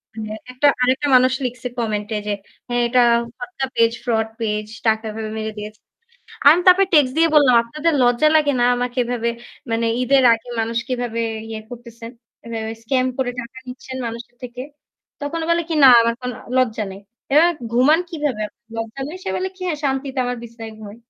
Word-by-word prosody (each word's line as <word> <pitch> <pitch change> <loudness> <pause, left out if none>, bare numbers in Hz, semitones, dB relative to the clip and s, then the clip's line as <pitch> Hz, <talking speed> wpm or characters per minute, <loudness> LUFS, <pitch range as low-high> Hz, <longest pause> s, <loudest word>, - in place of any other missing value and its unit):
মানে 215 -1 -6 0.2
একটা 255 +3 +2
আরেকটা 260 +3 +2
মানুষ 255 0 +5
লিখছে 250 0 -4
কমেন্টে 215 -2 -2
যে - - 0 0.6
এটা 250 +1 +2 0.4
ফটকা 365 -7 -4
পেজ, 230 0 +4
ফ্রড 225 -2 0
পেজ 210 -1 -2 0.2
টাকা 220 0 +2
এভাবে 220 0 -5
মেরে 220 0 -3
দিয়েছে। 210 +1 -8 0.7
আমি 315 +5 +8
তারপর 370 +1 +7
টেক্সট 290 -5 +5
দিয়ে 330 0 +5
বললাম, 285 -5 +6
"আপনাদের 305 +8 -1
লজ্জা 245 +5 +4
লাগেনা 285 -5 +2
আমাকে 245 +1 -3
এভাবে 235 -1 -2 0.4
মানে 230 0 0
ঈদের 265 +2 +3
আগে 230 +1 -2
মানুষ 230 +1 -1
কিভাবে 245 -2 -2 0.3
ইয়ে 220 -1 -5
করতেছেন। 235 -1 -10 0.3
এভাবে 225 -1 -4
স্কাম 255 +2 +1
করে 260 -2 0
টাকা 245 +2 -11
নিচ্ছেন 260 +1 -8
মানুষের 235 +1 -8
থেকে?" 250 0 -7 0.6
তখন 290 +3 -3
ও - - -5
বলে 340 0 +2
কি, 330 - -1
"না - - +10
আমার 230 0 +1
কোনো 250 -1 -4 0.2
লজ্জা 225 -4 +1
নেই।" 195 - -11 0.3
এবার 315 +4 +6 0.2
"ঘুমান 285 +7 +4
কিভাবে? 295 - -2 0.3
লজ্জা 225 +3 -5
নেই।" 325 - -7
সে - - -4
বলে 375 - -2
কি, 370 - -11
"হ্যাঁ, 320 -4 -2
শান্তিতে 270 0 -2
আমার 245 0 -2
বিছানায় 230 -1 -9
ঘুমাই।" 210 -1 -10
245 Hz, 175 wpm, -20 LUFS, 225-270 Hz, 0.7 s, না